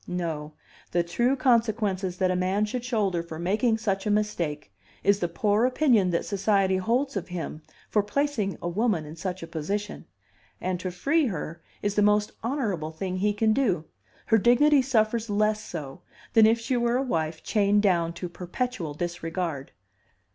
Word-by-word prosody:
No: 160 -4 -3 0.4
the 175 0 +1
true 240 +10 +1
consequences 220 -7 +1
that 185 -1 +2
a - - 0
man 190 +3 +1
should 235 +3 -4
shoulder 210 -8 0
for 165 -1 -8
making 215 +7 +1
such 200 -3 -1
a - - +1
mistake 170 - -1 0.3
is 200 +1 +4
the 175 - 0
poor 205 +5 +1
opinion 250 -7 +3
that 170 - 0
society 195 -1 +2
holds 240 +8 0
of 190 -3 -3
him 170 -3 -5 0.3
for 210 - +2
placing 215 -2 -1
a - - -1
woman 190 -3 0
in 150 +2 -9
such 180 +1 -4
a - - -6
position; 200 +7 -4 0.5
and 185 -1 -2
to 185 - -3
free 280 - +1
her 165 -4 -5 0.2
is 205 -1 0
the 210 - +2
most 210 0 +3
honorable 220 - -2
thing 185 +3 -4
he 205 +3 +2
can 220 +1 +2
do. 200 - +1 0.4
Her 225 - +4
dignity 275 +6 +5
suffers 230 -3 +1
less 215 +1 +1
so 145 -6 -7 0.3
than 220 -1 +7
if 225 +1 +3
she 235 +3 -1
were 240 0 +2
a 265 - 0
wife 160 -9 -2
chained 205 -1 +2
down 170 -4 +2
to 180 - -5
perpetual 180 -1 -4
disregard." 165 -3 -3
200 Hz, 175 wpm, -26 LUFS, 175-225 Hz, 0.5 s, than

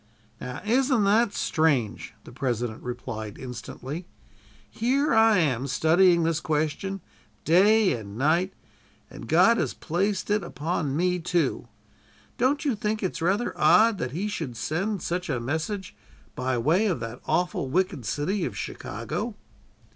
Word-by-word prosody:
"Now, 125 +2 -6
isn't 255 0 +2
that 210 +2 +3
strange?" 145 - 0
the - - -12
President 120 -3 -2
replied 115 -4 -6
instantly. 130 +6 -7 0.6
"Here 270 +5 +1
I 225 -2 +5
am, 135 -6 +1
studying 170 +5 +4
this 165 -1 +1
question, 160 +5 -2 0.4
day 200 +5 +5
and 105 -3 -7
night, 170 +8 +2 0.6
and - - -9
God 230 0 +5
has - - -1
placed 195 +5 -1
it 210 0 +2
upon 150 -2 -2
me, 180 +1 +1
too. 170 -7 -1 0.7
Don't 280 +5 +1
you 275 - +2
think 210 +1 -2
it's 185 -2 -2
rather 195 +8 +1
odd 225 -2 +5
that 125 - -2
He 175 +10 -3
should 160 - -4
send 190 - -2
such 180 +1 -2
a 130 -4 0
message 160 - -3 0.4
by 130 0 -1
way 165 - +2
of 180 - 0
that 115 +2 -6
awful 175 -6 0
wicked 180 -4 0
city 155 - -1
of 105 -9 -4
Chicago?" - - -5
170 Hz, 140 wpm, -26 LUFS, 130-205 Hz, 0.7 s, I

